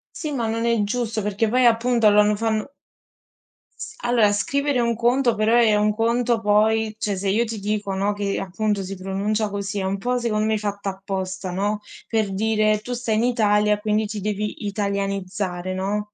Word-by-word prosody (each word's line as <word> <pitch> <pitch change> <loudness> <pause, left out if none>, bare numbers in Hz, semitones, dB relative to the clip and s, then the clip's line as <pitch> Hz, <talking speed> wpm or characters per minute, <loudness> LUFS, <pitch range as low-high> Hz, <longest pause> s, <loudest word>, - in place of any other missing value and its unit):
Sì, 305 -3 -4
ma 235 -4 -1
non 230 +1 -1
è 230 -3 +2
giusto, 225 0 -2
perché 210 +2 0
poi 250 +2 +2
appunto 235 -1 +3
loro 210 0 +4
fanno 220 +4 -2 1.1
S - - -7
allora, 235 -4 +3
scrivere 280 +6 0
un 235 -1 +1
conto 240 +1 +2
però 215 +2 +2
è 220 -3 +5
un 210 0 +2
conto 235 +1 +1
poi 215 +1 +2
cioè, 205 -3 -2
se 195 +1 -2
io 220 +5 +2
ti 225 -2 -5
dico, 205 -1 -2
no, 200 +2 0
che 200 -1 -2
appunto 200 +1 -1
si 190 +1 -6
pronuncia 200 +3 -1
così, 200 0 -3
un 195 +1 -1
po' 245 +4 -1
secondo 215 -3 0
me 220 0 +1
fatto 205 -1 -4
apposta, 190 -1 -4
no, 205 +3 -1 0.3
per 215 -4 0
dire: 215 0 +2
"Tu 245 +4 -7
stai 235 -2 -1
in 220 - +2
Italia 210 -3 +2
quindi 215 0 0
ti 205 0 -5
devi 210 +1 -3
italianizzare." 195 -2 -2
no. 205 +3 -2
210 Hz, 180 wpm, -22 LUFS, 200-225 Hz, 1.1 s, è